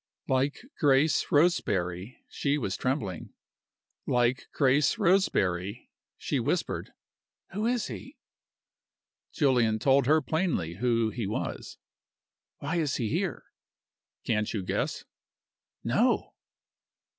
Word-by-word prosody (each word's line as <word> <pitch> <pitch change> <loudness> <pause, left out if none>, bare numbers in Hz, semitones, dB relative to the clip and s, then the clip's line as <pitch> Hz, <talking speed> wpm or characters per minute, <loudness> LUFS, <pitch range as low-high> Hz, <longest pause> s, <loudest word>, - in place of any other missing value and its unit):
Like 135 - 0 0.2
Grace 145 +1 +3
Roseberry, 100 - +1
she 145 0 -1
was 100 -9 -2
trembling. 120 - -3 0.7
Like 125 +1 +1
Grace 140 +1 +3
Roseberry, 100 - +1 0.3
she - - -1
whispered, - - -2 0.6
"Who 210 +4 -1
is 240 -2 0
he?" 270 +2 -8 1.1
Julian 125 -7 +2
told 135 +3 +3
her 155 +2 +5
plainly 145 - -1
who 115 -1 +1
he 115 -4 -3
was. 105 - -4 0.8
"Why 160 +5 -3
is 150 -5 0
he 115 -4 -1
here?" 175 - -2 0.8
"Can't 105 -2 0
you 105 -4 -3
guess?" - - -2 0.8
"No!" - - +1
130 Hz, 100 wpm, -28 LUFS, 110-155 Hz, 1.1 s, her